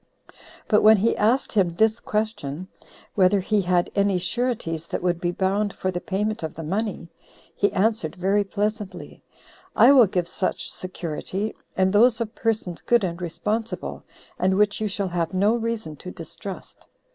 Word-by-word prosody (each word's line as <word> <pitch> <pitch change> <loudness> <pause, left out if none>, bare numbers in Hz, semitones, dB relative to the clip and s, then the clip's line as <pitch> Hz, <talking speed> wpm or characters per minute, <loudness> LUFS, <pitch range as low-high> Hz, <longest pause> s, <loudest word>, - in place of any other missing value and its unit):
But 210 - +4
when 215 0 +7
he 220 +4 +2
asked 230 +6 +2
him 195 -5 +3
this 220 +6 +2
question, 185 -7 -3 0.5
Whether 195 0 +4
he 205 +2 +1
had 180 -1 +1
any 200 -1 +2
sureties 180 -5 -2
that - - -4
would 175 -1 0
be 175 - 0
bound 195 +3 0
for 185 - -2
the 175 -1 -4
payment 210 +2 -2
of 160 -1 -5
the 165 - -6
money? 195 0 -3 0.4
he 200 - +2
answered 215 -5 0
very 195 +3 +1
pleasantly, 210 0 -4 0.5
"I - - +7
will 255 -6 +7
give 180 -2 -1
such 185 - -3
security, 185 +3 -4 0.2
and 190 0 +2
those 230 +2 +5
of 230 -1 -3
persons 215 -8 -2
good 240 -3 +3
and 175 -1 -3
responsible, 210 +7 -3 0.4
and 190 +1 +2
which 210 +1 +2
you 215 - +1
shall 200 -1 -2
have 170 0 -2
no 200 +4 +3
reason 230 -8 -3
to 180 - -9
distrust." 185 +2 -8
200 Hz, 165 wpm, -24 LUFS, 180-215 Hz, 0.5 s, when